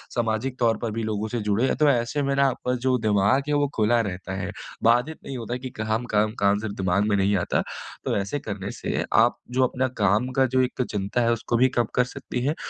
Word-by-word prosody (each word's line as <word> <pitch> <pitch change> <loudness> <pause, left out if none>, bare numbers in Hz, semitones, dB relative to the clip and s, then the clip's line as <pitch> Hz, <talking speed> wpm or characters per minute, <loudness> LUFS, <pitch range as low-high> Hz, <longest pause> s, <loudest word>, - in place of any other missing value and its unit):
सामाजिक 120 +2 -1
तौर 115 -2 +3
पर 115 - -1
भी 115 +1 -3
लोगों 110 0 -2
से 120 - -2
जुड़े 115 +6 +2
तो 150 -1 +5
ऐसे 120 +2 +1
में 140 0 0
ना 140 0 +4
आपका 125 0 -2
जो 130 -1 +3
दिमाग 105 +5 +3
है - - +1
वो 145 0 +2
खुला 115 +2 +3
रहता 95 -3 -5
है, 95 +2 -4 0.3
बाधित 120 +7 +3
नहीं 135 - -5
होता 115 0 -5
है 125 - -3
कि 130 0 -6
काम-काम-काम 110 -2 +1
सिर्फ 105 -1 -5
दिमाग 95 +1 +1
में 100 - +3
नहीं 100 +1 +2
आता। 90 - 0 0.4
तो - - 0
ऐसे 100 +8 -2
करने 100 -4 -5
से - - -2 0.2
आप 120 - +1 0.2
जो 130 - +5
अपना 130 +1 -1
काम 105 +5 +3
का 135 - +5
जो 130 - +5
एक 125 0 -1
चिंता 100 +4 -1
है 115 0 +3
उसको 115 +1 -1
भी 130 +2 +4
कम 120 - +3
कर 125 - +4
सकती 125 -2 -4
हैं 150 +3 +1
115 Hz, 230 wpm, -25 LUFS, 105-130 Hz, 0.4 s, तो